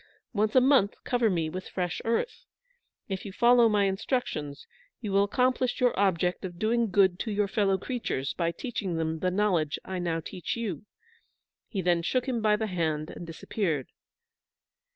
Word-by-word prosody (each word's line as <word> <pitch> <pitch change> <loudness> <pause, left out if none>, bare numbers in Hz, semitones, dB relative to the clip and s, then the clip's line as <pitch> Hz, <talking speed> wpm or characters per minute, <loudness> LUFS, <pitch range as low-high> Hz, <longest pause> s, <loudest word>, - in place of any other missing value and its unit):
Once 215 +1 +1
a 255 - +8
month 255 -6 +4
cover 240 -3 +2
me 165 -4 0
with 185 +4 -6
fresh 180 -2 -2
earth. 230 - -1 0.6
If 190 -2 -4
you 200 - -6
follow 240 +2 +5
my 210 -1 +3
instructions, 190 - -2 0.3
you 210 -4 -4
will 200 +1 +4
accomplish 255 +3 +1
your 250 -1 +3
object 180 -2 +1
of 175 -2 -6
doing 230 +3 +1
good 190 -2 +3
to 225 - -2
your 205 0 +1
fellow 200 -2 +2
creatures 190 - -3
by 170 -1 0
teaching 195 -3 -4
them 160 0 -1
the 185 - +1
knowledge 180 -6 +1
I 190 -1 -4
now 170 -2 -1
teach 175 +6 -5
you." 210 -4 -4 0.8
He 195 -4 -3
then 175 -1 +3
shook 250 +9 0
him 240 -3 -1
by 215 -1 +4
the 220 +1 -1
hand 160 -5 -2
and 175 - -8
disappeared. 165 - -2
195 Hz, 170 wpm, -28 LUFS, 175-225 Hz, 0.8 s, a